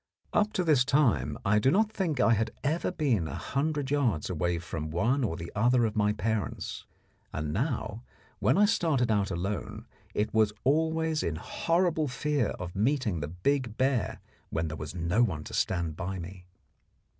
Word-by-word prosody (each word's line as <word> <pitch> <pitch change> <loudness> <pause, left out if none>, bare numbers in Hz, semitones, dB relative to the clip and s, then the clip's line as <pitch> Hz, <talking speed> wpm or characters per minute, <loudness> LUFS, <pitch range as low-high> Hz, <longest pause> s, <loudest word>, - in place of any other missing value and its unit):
Up 210 0 +3
to 185 - +1
this 150 -7 +4
time 135 -3 +2
I 105 +2 +4
do 130 - +3
not 215 +7 +3
think 175 -10 -1
I 115 - +5
had 110 +1 +1
ever 160 +6 0
been 130 - +1
a 70 - -5
hundred 145 0 -1
yards 115 - +1
away 85 +1 0
from 80 -2 -5
one 115 - +1
or 85 -8 -1 0.2
other 120 +3 +3
of 110 0 -2
my 105 -1 +3
parents, 110 0 -3 0.4
and 75 -1 -3
now, 110 - -2 0.4
when - - +3
I 210 - +6
started 160 - +2
out 100 -2 +1
alone, 95 +4 -4 0.3
it 105 - 0
was 110 -1 +3
always 160 +2 +1
in 80 - -1
horrible 165 - 0
fear 140 -1 0
of 90 -1 -6
meeting 110 - +1
the 75 - -3
big 115 - -1
bear 130 -7 +1 0.3
when 80 0 -1
there 80 - -5
was 75 +2 -6
no 85 +6 +1
one 80 -11 +1
to - - -10
stand 85 -4 0
by 95 +2 -4
me. 90 +1 -9
115 Hz, 175 wpm, -29 LUFS, 90-145 Hz, 0.4 s, I